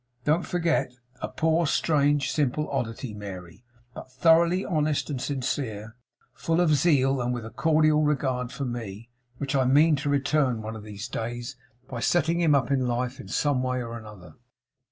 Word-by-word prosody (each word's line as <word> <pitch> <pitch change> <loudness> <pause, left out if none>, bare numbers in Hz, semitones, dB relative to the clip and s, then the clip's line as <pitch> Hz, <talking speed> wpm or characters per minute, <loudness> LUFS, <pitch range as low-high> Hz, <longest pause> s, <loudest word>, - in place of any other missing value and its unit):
Don't 155 +4 +1
forget; 165 -7 0 0.3
a - - -2
poor, 160 0 +1
strange, 145 -1 +2
simple 150 +1 0
oddity, 120 -3 -3
Mary; 95 -1 -9 0.3
but - - -10
thoroughly 170 +6 +3
honest 155 -4 0
and 130 -3 -3
sincere; 125 -5 -3 0.4
full 165 +1 -1
of 170 -3 +4
zeal; 135 -3 +3
and 120 0 -1
with 120 -2 -4
a 110 - -8
cordial 155 -1 +3
regard 130 -4 0
for 140 - -4
me. 115 -2 -6 0.3
Which 140 0 -3
I 130 -1 +3
mean 150 +5 +5
to 145 +1 -2
return 140 -4 +1
one 110 +1 -5
of 110 - -8
these 105 +1 -7
days, 120 +3 -5 0.3
by 125 - -6
setting 170 +5 +1
him 155 -4 +4
up 130 -2 +1
in 130 -2 +1
life 125 +2 -2
in - - -9
some 145 -3 +1
way 130 0 -1
or 115 -1 -7
other. 95 -7 -12
135 Hz, 175 wpm, -26 LUFS, 120-150 Hz, 0.4 s, mean